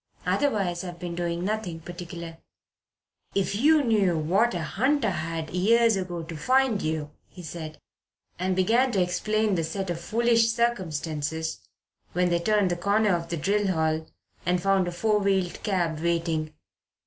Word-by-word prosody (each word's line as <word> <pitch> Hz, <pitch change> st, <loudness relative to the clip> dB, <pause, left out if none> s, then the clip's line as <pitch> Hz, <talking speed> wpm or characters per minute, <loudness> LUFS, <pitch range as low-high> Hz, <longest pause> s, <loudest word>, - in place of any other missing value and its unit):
Otherwise 195 Hz, -11 st, 0 dB
I've 175 Hz, -2 st, -7 dB
been 175 Hz, 0 st, -5 dB
doing 170 Hz, 0 st, -2 dB
nothing 205 Hz, -5 st, -2 dB
particular." 170 Hz, -1 st, -8 dB, 1.0 s
"If 195 Hz, -2 st, +1 dB
you 300 Hz, +7 st, +4 dB
knew 205 Hz, -8 st, +2 dB
what 190 Hz, +9 st, +2 dB
a 170 Hz, -, -2 dB
hunt 260 Hz, -, +1 dB
I 205 Hz, -, +2 dB
had 160 Hz, -1 st, -4 dB
years 225 Hz, +5 st, +4 dB
ago 180 Hz, -3 st, -3 dB
to 165 Hz, 0 st, -7 dB
find 255 Hz, -, +2 dB
you," 155 Hz, -1 st, -2 dB, 0.2 s
he 180 Hz, -, -12 dB
said, 160 Hz, -1 st, -7 dB, 0.6 s
and 185 Hz, +1 st, 0 dB
began 230 Hz, +8 st, +3 dB
to 195 Hz, -, +2 dB
explain 215 Hz, +4 st, 0 dB
the 170 Hz, -3 st, +1 dB
set 185 Hz, +3 st, -3 dB
of 170 Hz, 0 st, -4 dB
foolish 230 Hz, +3 st, +3 dB
circumstances 160 Hz, -, -2 dB, 0.5 s
when 180 Hz, +1 st, +2 dB
they 170 Hz, 0 st, +2 dB
turned 205 Hz, 0 st, +2 dB
the -, -, +1 dB
corner 200 Hz, +1 st, +2 dB
of 170 Hz, -1 st, -4 dB
the 170 Hz, -, -2 dB
drill 200 Hz, +6 st, +1 dB
hall 160 Hz, -3 st, 0 dB, 0.4 s
and 180 Hz, +1 st, +1 dB
found 195 Hz, 0 st, +2 dB
a -, -, -2 dB
four 210 Hz, +4 st, +1 dB
wheeled 190 Hz, -3 st, 0 dB
cab 175 Hz, -6 st, 0 dB
waiting. 165 Hz, -2 st, -1 dB
180 Hz, 160 wpm, -26 LUFS, 165-210 Hz, 1.0 s, you